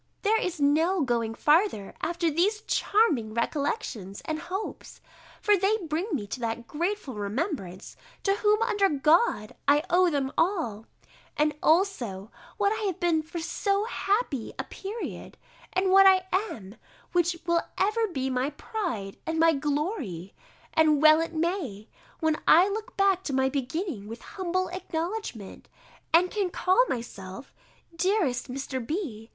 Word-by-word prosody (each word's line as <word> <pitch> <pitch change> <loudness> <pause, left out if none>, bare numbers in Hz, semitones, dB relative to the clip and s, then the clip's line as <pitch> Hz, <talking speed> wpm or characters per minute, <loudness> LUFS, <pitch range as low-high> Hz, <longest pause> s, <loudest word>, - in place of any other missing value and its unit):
There 445 +1 +3
is 365 -3 -3
no 320 +6 +3
going 230 -3 -1
farther 300 - +2
after 340 -1 0
these 400 +8 +1
charming 300 - +1
recollections 235 - -2
and 315 0 -2
hopes, 380 +6 -6 0.4
for 415 - +5
they 395 +3 +2
bring 335 -1 -3
me 230 -9 -1
to 205 - -6
that 235 0 -3
grateful 340 - -3
remembrance, 205 - -4 0.3
to 395 0 +2
whom, 425 +1 +3
under 415 -4 +2
God, 300 - +2
I 290 +2 +5
owe 360 +1 +5
them 275 -4 -1
all, 320 - 0 0.5
and 300 0 +2
also 255 - +1 0.3
what 405 -1 +2
I 440 -1 -3
have 370 - -3
been 335 -2 +2
for 315 +2 -8
so 395 +4 0
happy 400 - -1
a - - -2
period, 420 +4 -7 0.3
and 375 0 +1
what 390 0 +8
I 375 -1 +5 0.3
am, 200 0 -10 0.3
which 350 -1 +2
will 340 -1 +2 0.2
ever 435 +3 +2
be 265 -8 -3
my 260 +1 0
pride 275 - -4
and 325 0 -1
my 325 0 +5
glory; 285 - -3 0.4
and 310 -2 +4
well 310 +1 +7
it 330 0 -4
may, 315 - -2 0.3
when 315 -1 +2
I 350 +4 +7
look 430 +2 -5
back 390 -2 +3
to 280 - -2
my 265 0 +2
beginning 270 - -3
with 230 +2 -9
humble 370 -1 -2
acknowledgment, 340 - -5 0.4
and 350 +3 +4
can 405 -4 0
call 370 +7 +3
myself, 200 -3 -6 0.4
dearest 335 - +1
Mr. 265 -1 -4
B. 235 - -4
320 Hz, 145 wpm, -27 LUFS, 255-385 Hz, 0.5 s, what